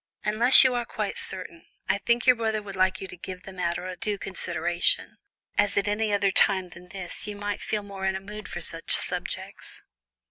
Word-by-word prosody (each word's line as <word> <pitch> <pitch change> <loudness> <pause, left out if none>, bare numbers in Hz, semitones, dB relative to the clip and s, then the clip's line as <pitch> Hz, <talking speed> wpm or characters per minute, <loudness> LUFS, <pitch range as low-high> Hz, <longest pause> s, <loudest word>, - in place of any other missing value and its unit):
Unless 230 +5 +9
you 260 -1 +3
are 240 -1 -1
quite 215 -3 -4
certain, 180 -3 -8 0.2
I - - +1
think 235 +3 0
your 250 - +6
brother 220 -2 -2
would 200 -1 -8
like 185 0 +1
you 190 - -5
to 180 - -9
give 180 +1 -9
the 195 - -10
matter 180 0 -3
due 205 +2 -3
consideration, 175 -2 -1 0.4
as 205 -1 +2
at 200 - +1
any 210 +1 0
other 200 -1 +2
time 190 -1 +2
than 175 +2 -14
this 185 +2 -6
you 210 - -5
might 205 0 -4
feel 210 -1 -2
more 195 -1 -7
in 190 - 0
a - - -3
mood 210 +2 -9
for - - -6
such - - 0
subjects." - - -5
195 Hz, 205 wpm, -26 LUFS, 185-210 Hz, 0.4 s, Unless